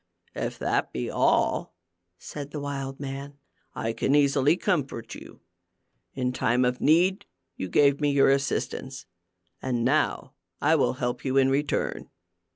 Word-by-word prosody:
"If - - -4
that - - -1
be 60 - -3
all," - - +1 0.4
said 145 +8 -8
the 150 - -6
wild 135 -1 -5
man, 140 0 -6 0.4
"I 115 0 -2
can 135 +5 +1
easily 145 +2 +3
comfort 145 - -2
you. - - -12 0.7
In 125 -1 -1
time 125 0 +2
of 125 0 -1
need, 180 +6 +3 0.3
you 95 - -5
gave 140 - +3
me 145 - +2
your 140 -1 +4
assistance, 135 -1 -2 0.6
and 120 -3 -1
now - - 0 0.3
I 155 +2 +3
will 145 - +2
help 125 -2 -3
you 135 0 0
in 135 0 +4
return." 140 +2 -1
135 Hz, 145 wpm, -26 LUFS, 130-145 Hz, 0.7 s, your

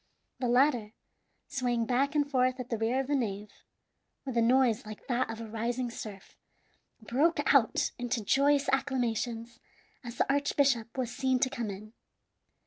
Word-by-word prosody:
The 250 - -1
latter, 245 -3 +2 0.5
swaying 245 -4 -1
back 275 +5 +1
and 290 -1 +2
forth 255 -2 +1
at 250 0 -7
the 230 - 0
rear 230 +4 +1
of - - -5
the 290 - -2
nave, 210 -5 -3 0.7
with 260 -3 -4
a 235 - +3
noise 245 0 +3
like 215 -2 -10
that 250 -1 0
of 225 0 -5
a 230 - -6
rising 235 +3 -2
surf, 205 -4 -9 0.7
broke 290 +7 +2
out 255 -6 +3
into 245 -2 -2
joyous 280 +4 +3
acclamations 240 -3 -1 0.4
as 240 -1 -8
the - - +3
archbishop 275 -4 +1
was 245 -2 -2
seen 260 -1 +1
to 260 - +2
come 235 -5 -3
in. 210 +3 -9
245 Hz, 160 wpm, -30 LUFS, 230-270 Hz, 0.7 s, a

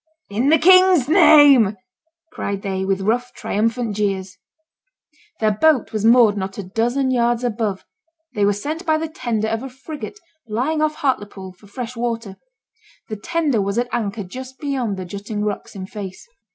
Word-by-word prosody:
'In 235 +7 +1
the 320 - +6
King's 370 -4 +6
name!' 290 - +6 0.5
cried 200 0 -4
they, 190 -1 -2
with 195 0 -1
rough, 245 +5 0
triumphant 225 +1 -1
jeers. 195 -2 -2 1.0
Their 215 -1 +2
boat 260 +3 +2
was 215 -1 -2
moored 230 -2 +5
not 195 -1 -5
a 205 - -4
dozen 240 +8 0
yards 240 -1 +1
above; 215 -5 -2 0.5
they 205 - 0
were 200 - +4
sent 300 - -4
by 315 -3 +2
the 320 +1 -3
tender 240 -8 -2
of 225 0 -2
a 270 - -6
frigate 295 +9 -9 0.3
lying 260 +9 -1
off 310 0 +1
Hartlepool 205 -8 -3
for 205 +3 -20
fresh 245 +4 -6
water. 230 -4 -4 0.7
The 215 - -3
tender 285 0 0
was 200 +2 -2
at 245 +1 0
anchor 215 -3 -2
just 260 +7 -9
beyond 260 -9 -2
the 185 - -5
jutting 205 +3 -5
rocks 210 0 -4
in 190 -1 -6
face. 195 - -8
230 Hz, 165 wpm, -20 LUFS, 205-265 Hz, 1.0 s, the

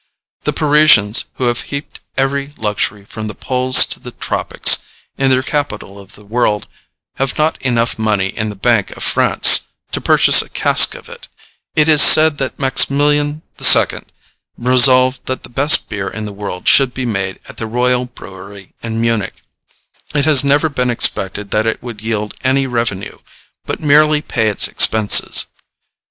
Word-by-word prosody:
The - - -1
Parisians, 145 -8 +2
who - - -6
have 120 0 -2
heaped 140 +1 -8 0.2
every 140 +1 -3
luxury, 105 -1 -4
from 110 +1 -9
the 105 - -9
poles 130 0 +4
to - - -5
the - - -11
tropics, - - 0 0.4
in 135 0 -1
their 130 0 +1
capital 110 -9 -5
of 100 +1 -16
the 105 - -19
world, 105 -1 -2 0.5
have 135 -1 -3
not 155 +1 -2
enough 120 -3 -2
money 105 -3 -1
in 110 +2 -5
the 105 - -9
Bank 110 0 -1
of - - -6
France - - +4 0.2
to - - -5
purchase - - +5
a - - -12
cask - - +2
of - - -14
it. - - -14 0.5
It 155 0 +2
is 155 -2 +5
said 155 -2 +7
that 135 -1 -5
Maximilian 145 +3 0 0.2
II. - - +5 0.6
resolved 130 +1 +2
that 130 - -5
the - - -10
best 140 +5 +3
beer 100 -1 -6
in 110 +2 -7
the 105 - -8
world 100 -3 -8
should 135 -3 +3
be 130 - -5
made 95 -4 -5
at - - -13
the 110 - -5
royal 125 +2 -2
brewery 100 -4 -14
in 115 -1 -6
Munich. 115 -3 -2 0.8
It 145 -1 0
has 145 -4 +4
never 145 +3 +1
been 125 -4 -3
expected 100 -3 -1
that 110 +1 -1
it 110 - -4
would 115 -4 -10
yield 110 -1 -5
any 135 +1 0
revenue, 115 -6 -5 0.5
but - - -5
merely 150 0 +2
pay 115 -8 -3
its 105 - +1
expenses. 110 -2 +3
125 Hz, 170 wpm, -14 LUFS, 105-140 Hz, 0.8 s, said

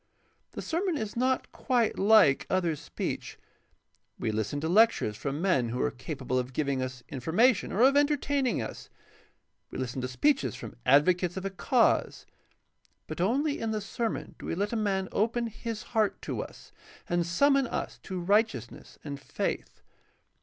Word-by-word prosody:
The - - -6
sermon 345 0 -1
is 215 -4 -4
not 255 +2 0
quite 245 -4 +1
Kke 195 -9 +5
other 175 -4 +1
speech. - - -5 0.8
We 110 - -1
listen 110 +6 -2
to 160 - -1
lectures 200 - +4
from 140 - -3
men 140 -12 +2
who 125 +2 -3
are 145 - +1
capable 130 -1 -3
of 125 +1 -4
giving 140 -2 0
us 130 -1 -5
information 180 - +2
or 210 - 0
of 270 +2 +6
entertaining 285 - +1
us; - - -8 0.8
we - - -7
Hsten 130 0 -3
to 125 - -2
speeches 130 - +1
from - - -9
advocates 175 +5 +4
of 190 - -4
a 195 - -2
cause; 235 +5 +1 0.8
but - - -5
only 280 - +1
in 225 - -2
the 215 -1 -1
sermon 220 +3 -3
do - - -8
we - - -2
let 205 +5 -1
a - - 0
man 195 -3 0
open 230 +3 0
his 225 -1 -5
heart 215 -3 +2
to - - -3
us - - -11 0.4
and 175 0 +1
summon 275 +10 +3
us - - -4
to 185 -1 -5
right 205 +6 +4
eousness 120 - -10
and 140 -2 -6
faith. - - -4
190 Hz, 165 wpm, -29 LUFS, 140-230 Hz, 0.8 s, of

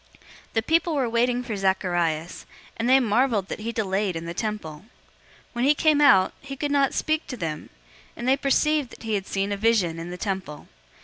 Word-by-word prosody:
001:021 - - -31 0.5
The 225 - +3
people 330 +3 +1
were 265 -4 +1
waiting 240 +2 +1
for 230 -3 -4
Zacharias, 175 -4 -1 0.3
and 230 +2 -1
they 265 +1 +7
marveled 225 -4 +1
that - - -5
he 225 +2 -4
delayed 195 -4 -1
in 165 0 -5
the 170 - -5
temple. 210 -8 -4 0.7
001:022 - - -33
When 240 0 -2
he 290 +2 +4
came 305 -1 +3
out, 190 -10 +5
he 275 0 -7
could 290 +1 -2
not 280 -2 +2
speak 310 +1 -1
to 250 - -6
them, 155 -5 -5 0.5
and 240 - -4
they 265 - +5
perceived 285 0 +1
that - - -14
he 220 -1 -2
had 195 -2 -2
seen 195 +1 -2
a 200 - -1
vision 195 -7 +1
in 165 +1 -6
the 180 - -6
temple. 190 -7 -5
220 Hz, 210 wpm, -24 LUFS, 190-265 Hz, 0.7 s, they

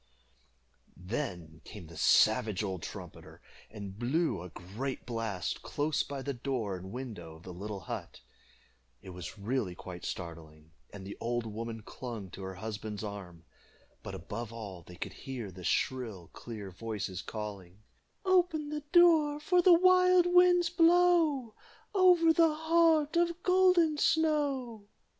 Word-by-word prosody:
Then 90 - -5
came 105 -5 -10
the 80 +1 -13
savage 110 +5 +3
old 95 -4 -3
trumpeter, - - -9 0.3
and 100 -2 -8
blew 145 - 0
a 90 - -8
great 110 - -6
blast 115 -6 -3
close 145 +1 -1
by 140 -2 -5
the 140 - -2
door 120 -6 -3
and 95 +1 -8
window 110 -11 -7
of 80 - -16
the 90 - -8
little 100 +2 -6
hut. 75 - -7 0.8
It 95 - -9
was 90 +3 -8
really 105 -3 -2
quite 90 -1 -9
startling, 80 -2 -7 0.2
and 100 -2 -9
the 100 - -7
old 120 0 -2
woman 115 0 -6
clung 115 -8 -7
to 95 - -9
her 95 0 -6
husband's 105 +1 -6
arm; 95 -5 -8 0.6
but - - -7
above 110 +6 -6
all 105 -6 -8
they 90 +2 -13
could - - -6
hear 125 -7 -7
the 90 0 -11
shrill 110 - -2
clear 105 -5 -8
voices 100 -2 -5
calling 105 -2 -7 0.4
"Open 350 -5 +2
the 300 0 -3
door, 320 -4 +5
For 355 +4 +3
the 350 -1 +7
wild 365 0 +5
winds 355 -1 +5
blow 330 -8 +4 0.4
Over 360 -4 +5
the 325 -2 +4
heart 320 -1 +3
Of 340 0 +1
Golden 365 -4 +4
Snow." 280 -10 +1
115 Hz, 145 wpm, -31 LUFS, -, 0.8 s, the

